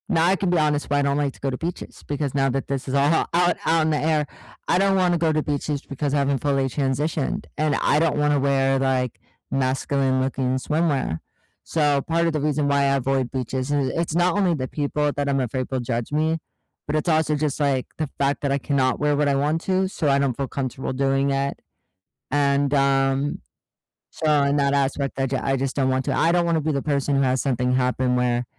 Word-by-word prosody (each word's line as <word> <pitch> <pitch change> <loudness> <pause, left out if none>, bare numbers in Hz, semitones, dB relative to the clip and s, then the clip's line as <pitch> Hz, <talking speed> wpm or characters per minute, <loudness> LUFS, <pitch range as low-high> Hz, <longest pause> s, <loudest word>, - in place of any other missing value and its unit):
Now, 165 -4 +3
I 190 - +4
can 190 0 -1
be 175 - +2
honest 150 -2 +1
but 145 - +2
I - - +3
don't 140 0 +1
like 145 -2 0
to - - -18
go 135 - -2
to 130 - -3
beaches, 170 +4 -6
because 145 -2 -2
now 135 -1 +2
that 135 +1 -2
this 135 -1 -3
is 130 - -3
all 140 +2 +3
o - - +2
out 175 0 +3
out 165 0 +3
in 160 - +1
the 150 - +1
air, 155 -1 +1 0.4
I - - +3
don't 195 +1 +3
wanna 180 -2 +2
go 165 -1 +1
to 155 0 +1
beaches 145 -1 -2
because 140 +1 -4
I - - +2
haven't 140 -1 +1
fully 140 -1 +1
transitioned, 140 +2 -1
and 150 -2 +1
I 150 - +3
don't 165 -2 +1
wanna 150 -1 +2
wear, 135 -1 +2
like, 130 -2 0 0.3
masculine-looking 130 -1 0
swimwear. 140 - 0 0.4
So, 145 -3 +1
part 170 +3 0
of 165 - 0
the 155 - -1
reason 150 -1 0
why 140 0 +2
I 140 0 +2
avoid 135 -1 0
beaches, 130 +1 -3
i 145 - +2
it's 155 +5 -2
not 175 +1 +2
only 190 -4 +2
the 130 -5 -3
people 145 +1 -1
that 145 0 -2
I'm 135 -1 +1
afraid 130 0 -2
will 130 - 0
judge 120 0 -3
me, 160 +2 +1 0.5
but 150 - -1
it's 155 - -2
also, 155 -2 +2
just, 150 -1 -2
like, 140 -3 +1
the 155 - -2
fact 140 +1 0
that 140 - -1
I 140 - +2
cannot 135 -2 0
wear 150 0 +2
what 145 0 +1
I 140 - +2
want 150 +4 0
to 190 0 +1
so 160 -5 -1
I 140 0 +3
don't 135 -3 0
feel 135 +1 -3
comfortable 130 0 -4
doing 135 +1 +1
it, 135 0 -1 0.7
and, 140 0 +2
um 135 0 +1 0.7
so, 155 - -1
in 140 +1 +1
that 140 0 +2
aspect, 140 0 -1
I 135 - +1
j 135 +1 -2
I 135 +1 0
just 135 0 -2
don't 135 -2 +1
want 130 0 0
to - - -1
I 165 - +3
don't 175 0 +2
wanna 165 -1 +1
be 155 +1 -1
the 140 -1 -1
person 140 -1 0
who 135 - +2
has 130 -1 +1
something 125 -2 0
happen 125 0 +1
where, 125 -1 +1
140 Hz, 235 wpm, -23 LUFS, 135-150 Hz, 0.7 s, I